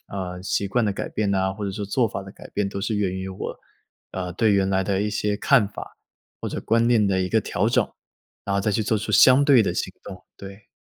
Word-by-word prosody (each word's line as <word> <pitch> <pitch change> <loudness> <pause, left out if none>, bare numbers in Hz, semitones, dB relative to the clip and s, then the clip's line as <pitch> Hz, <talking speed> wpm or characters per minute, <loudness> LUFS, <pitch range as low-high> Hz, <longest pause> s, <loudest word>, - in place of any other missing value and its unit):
呃， 90 -2 -5
习 100 +1 -1
惯 115 +4 +1
的 105 - 0
改 - - -5
变 105 -2 -1
呐， 95 -1 +1
或 105 0 -5
者 100 - -2
说 100 +1 -5
做 115 +4 +1
法 95 - -6
的 95 - -11
改 - - -13
变 100 -1 -1
都 100 0 -5
是 105 +2 -1
源 100 -3 0
于 95 0 -5
我， 95 - -6 0.5
呃， 90 -1 -4
对 110 +3 +2
原 100 -1 +2
来 95 0 +1
的 95 0 -1
一 105 - 0
些 105 0 -1
看 115 -1 +3
法， 105 - -10 0.4
或 - - -3
者 - - -4
观 115 +1 +2
念 110 -4 +3
的 95 -1 +1
一 90 - -1
个 110 - +2
调 - - -1
整， - - +2 0.6
然 100 - -2
后 - - +1
再 105 +1 0
去 110 - +1
做 110 +1 0
出 105 - -4
相 130 +2 +6
对 135 -5 +6
的 - - -1
行 - - -3
动， 95 -2 -10
对。 100 +1 -11
100 Hz, 280 characters per minute, -23 LUFS, 95-110 Hz, 0.6 s, 相